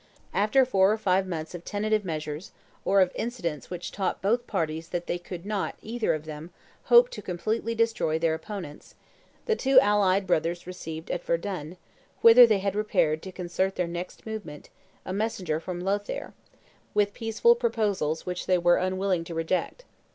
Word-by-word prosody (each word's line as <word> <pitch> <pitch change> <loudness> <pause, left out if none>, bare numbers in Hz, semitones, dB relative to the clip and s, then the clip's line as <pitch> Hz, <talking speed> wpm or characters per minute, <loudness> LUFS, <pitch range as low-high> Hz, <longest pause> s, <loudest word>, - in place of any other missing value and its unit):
After 215 +6 +3
four 195 -5 +4
or 215 - +1
five 190 -2 +1
months 160 -2 -5
of 175 -1 -7
tentative 215 +2 0
measures 155 -1 -5 0.3
or 195 0 +4
of 185 - +3
incidents 180 - -4
which 180 -1 -5
taught 195 -2 -2
both 235 +5 0
parties 160 -4 -2
that 175 0 -3
they 175 - -2
could 175 0 -8
not, 205 -2 -2
either 225 -4 0
of 155 0 -7
them, 155 +1 -8 0.4
hope 485 +1 +7
to - - -7
completely 220 +6 -2
destroy 225 -8 +1
their 160 0 +1
opponents, 160 -3 -7 0.5
the 450 - +2
two 270 -8 +5
allied 200 -4 +3
brothers 170 -1 0
received 160 -3 -7
at 175 - -3
Verdun, 170 -1 -3 0.4
whither 235 +1 +9
they 215 -2 +3
had 195 0 -1
repaired 165 -7 +1
to 190 - -8
concert 185 +1 -2
their 180 - 0
next 175 +1 -7
movement, 210 -10 -7 0.4
a 185 - -4
messenger 190 -7 -1
from 175 +1 -5
Lothaire, 200 +3 -3 0.6
with 205 -1 +2
peaceful 230 - +3
proposals 205 - -1
which 180 0 -4
they 185 - +4
were 175 0 +4
unwilling 185 -1 0
to 165 0 -7
reject. 180 - -2
185 Hz, 170 wpm, -27 LUFS, 170-215 Hz, 0.6 s, whither